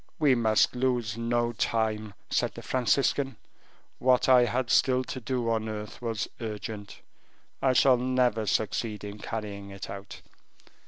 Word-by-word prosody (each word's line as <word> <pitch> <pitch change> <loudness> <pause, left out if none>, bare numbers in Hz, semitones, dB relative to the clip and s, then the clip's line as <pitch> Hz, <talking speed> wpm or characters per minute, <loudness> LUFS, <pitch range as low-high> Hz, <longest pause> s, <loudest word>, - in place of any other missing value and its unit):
"We 145 -4 +4
must 110 -3 +3
lose 125 -4 0
no 120 0 0
time," 110 -2 -1 0.2
said - - 0
the - - -9
Franciscan; 135 +1 +1 0.6
"what 125 0 +3
I 125 -2 +7
had 125 +1 -1
still 130 -1 +4
to 130 - -6
do 120 -1 -1
on 110 -1 -1
earth 105 +1 -6
was 115 -3 -2
urgent. 105 -2 -6 0.6
I 130 -1 +3
shall 130 0 +5
never 125 -3 +1
succeed 105 +2 -1
in 105 0 -7
carrying 105 -2 -5
it 100 0 -7
out." 100 0 -9
115 Hz, 145 wpm, -28 LUFS, 105-125 Hz, 0.6 s, I